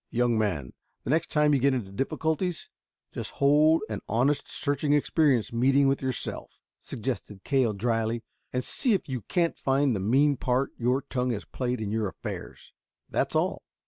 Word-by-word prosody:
"Young 120 0 +1
man, 90 - -1 0.3
the - - -2
next 160 +2 +1
time 150 -1 +3
you 140 - +3
get 135 +1 +3
into 105 -6 -4
difficulties, 160 - -2 0.4
just - - -4
hold 150 +4 +4
an - - -4
honest, 135 +6 +1
searching 145 0 0
experience 145 -5 +2
meeting 135 +4 +4
with 135 0 +1
yourself," 130 -2 -4 0.2
suggested 105 -4 -5
Cale 130 -6 +2
dryly, 115 +2 -1 0.3
"and 125 0 -1
see 245 - 0
if 195 - -1
you 130 -3 -3
can't 170 - 0
find 135 -2 +2
the - - -2
mean 135 +8 +3
part 130 +1 0
your 125 +3 0
tongue 125 -3 -2
has 105 -5 -3
played 125 -1 -3
in 105 -2 -3
your 110 -1 0
affairs. - - -8 0.4
That's - - 0
all." - - +1
130 Hz, 170 wpm, -27 LUFS, 115-145 Hz, 0.4 s, hold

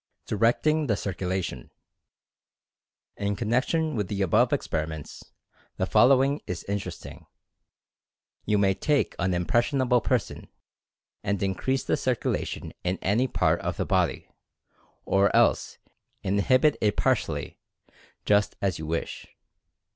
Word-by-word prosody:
DIRECTING 145 +8 +1
THE 105 -4 +1
CIRCULATION. 95 -2 -3 1.5
In 100 0 -1
connection 130 +8 0
with 105 -4 -1
the 100 0 -1
above 90 - +3
experiments, 80 -1 -3 0.5
the - - 0
fol - - +5
lowing 135 +2 +3
is 90 -2 -4
interesting. 100 0 -6 1.2
You 105 0 +1
may 100 -1 +3
take 145 +8 0
an 95 -1 +1
impression 120 - +1
able 125 -2 +3
person, 125 0 -2 0.8
and 100 -1 -1
increase 130 +8 -1
the - - 0
circulation 125 -2 -2
in 90 +1 -1
any 115 +7 +2
part 85 -8 +1
of - - -3
the - - -1
body, - - 0 0.8
or 100 +1 +2
else - - +2 0.5
inhibit 130 +9 +3
it 105 -1 +1
partially, - - -1 0.7
just 105 0 +2
as 95 -4 -1
you 80 - -6
wish. 85 +1 -4
100 Hz, 120 wpm, -26 LUFS, 95-130 Hz, 1.5 s, fol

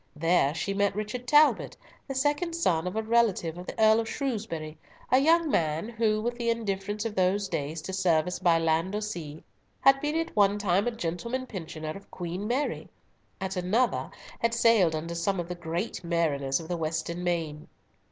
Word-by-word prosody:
There 160 -2 +2
she 195 +4 -2
met 200 -1 +1
Richard 215 +4 -4
Talbot, 300 +3 +4 0.3
the 270 - -4
second 290 +5 0
son 180 - +1
of 180 - -4
a 220 - 0
relative 220 -8 +2
of 180 +1 -9
the - - -7
Earl 220 0 +6
of 225 -1 -2
Shrewsbury, 205 - -3 0.4
a 255 - +6
young 325 +2 +3
man 160 +5 0
who, 225 -2 +1
with 240 +1 -2
the 235 -1 0
indifference 205 -2 -2
of 225 - -2
those 195 +1 +1
days 155 -1 -3
to 190 - -5
service 180 -2 +1
by 175 -3 +4
land 165 +4 +1
or 210 - -1
sea, 165 -8 -6 0.4
had 270 0 +5
been 295 +1 -1
at 330 0 -2
one 205 -1 +4
time 200 +1 +1
a - - +1
gentleman 230 +6 -3
pensioner 160 -7 -6
of 195 +5 -11
Queen 180 +3 -5
Mary; 260 +5 -1 0.5
at 190 0 -3
another 205 +8 +1 0.3
had 230 0 +1
sailed 220 -9 +4
under 165 +2 -4
some 180 +3 -1
of 170 - -3
the - - -2
great 175 +5 -4
mariners 150 -6 0
of 165 - -8
the 175 0 -2
western 165 +2 -3
main. 165 -4 -2
190 Hz, 190 wpm, -28 LUFS, 165-230 Hz, 0.5 s, Earl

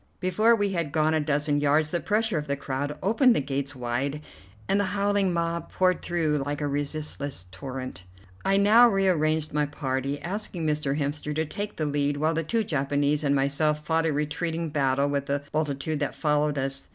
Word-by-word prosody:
Before 215 +5 +3
we 205 -2 0
had 170 -6 -2
gone 155 +1 +2
a 160 - +2
dozen 145 0 0
yards 150 +2 +2
the 175 - 0
pressure 210 +2 +1
of 150 - -6
the 140 - 0
crowd 140 +1 -3
opened 230 +4 +4
the - - +2
gates 140 0 -3
wide, 130 +4 -2 0.4
and 195 +1 +2
the 205 - +2
howling 200 -1 +2
mob 170 -1 -2
poured 185 -1 +2
through 155 -4 0
like 145 +1 -3
a 150 - -1
resistless 145 - -3
torrent. 130 -4 -7 0.4
I 195 0 +3
now 220 +4 +7
re 195 -2 +2
arranged 155 -3 +1
my 150 0 +1
party, 140 -1 -2
asking 180 -2 -3
Mr. 150 -2 0
Hemster 150 0 -2
to 160 +1 0
take 205 +6 -5
the 155 - -1
lead, 145 0 0
while 155 +2 +1
the 165 0 -1
two 225 +7 0
Japanese 145 -2 0
and 140 -1 +2
myself 150 +2 +1
fought 165 0 +1
a - - +1
retreating 160 +3 -2
battle 140 -2 +1
with 140 -1 -1
the 140 0 -1
multitude 150 0 -1
that 145 - -2
followed 150 -1 +1
us. 135 0 -3
150 Hz, 195 wpm, -26 LUFS, 140-170 Hz, 0.4 s, now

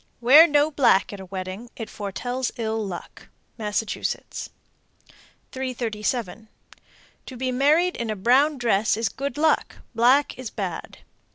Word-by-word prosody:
Wear 280 +8 +8
no 295 0 +3
black 250 -9 +3
at 200 - -8
a 190 - -8
wedding; 190 +5 -6
it 225 - -6
foretells 245 +5 -4
ill 220 -1 -2
luck. 185 -4 -8 0.3
Massachusetts. 210 0 -3 1.0
337. 235 -4 -3 0.8
To 255 - -8
be 255 +1 -2
married 305 +8 +3
in 235 -1 -3
a 215 - -1
brown 265 +9 +3
dress 220 -4 +1
is 225 -2 0
good 275 +5 -5
luck; 315 +1 +1 0.2
black 250 +5 +3
is 255 -4 -5
bad. 185 -6 -5
235 Hz, 130 wpm, -24 LUFS, 210-265 Hz, 1.0 s, Wear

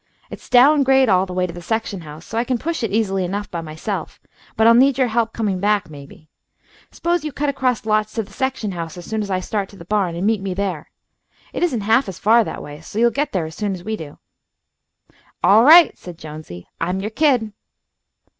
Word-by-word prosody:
It's - - -11
down 275 +4 +6
grade 265 -2 +4
all 190 0 +3
the 180 - -7
way 180 0 0
to 175 - -6
the 175 - -9
section 210 +1 -3
house, 155 +1 -11
so - - -9
I 230 - +1
can 250 0 -1
push 330 +7 -3
it 225 - -1
easily 195 -2 0
enough 200 +3 -4
by 170 - -4
myself, 160 +3 -6 0.4
but 220 - +3
I'll 230 - +7
need 265 +3 +4
your 255 -2 +2
help 225 0 0
coming 205 -5 -2
back, 205 -4 0
maybe. 145 +2 -13 0.6
S'pose 345 -1 -1
you 305 - -4
cut 290 +1 -2
across 255 -5 -1
lots 215 0 0
to 225 - -1
the 200 0 -17
section 260 -5 -2
house 170 -2 -6
as 175 - -9
soon 220 -1 -3
as 205 - -5
I 185 -1 0
start 200 0 -3
to - - -15
the 170 - -12
barn, 190 -3 0
and 175 +3 -2
meet 215 -2 +1
me 195 -2 -4
there. 185 -6 -3 0.6
It - - -4
isn't 300 -11 0
half 220 +4 +2
as 185 - -8
far 230 +2 +4
that - - -6
way, 145 +1 -10
so 185 - -10
you'll 235 +1 +4
get 285 +2 -2
there 180 -4 -1
as 160 - -8
soon 205 +1 -3
as 175 - -10
we 220 +2 -3
do." 155 -8 -10 1.3
"All 215 +3 +6
right," 330 +5 +8
said 175 -2 -11
Jonesy. 150 - -10
"I'm 180 +3 -1
your 210 +3 -4
kid." 245 -5 +1
210 Hz, 230 wpm, -20 LUFS, 180-235 Hz, 1.3 s, right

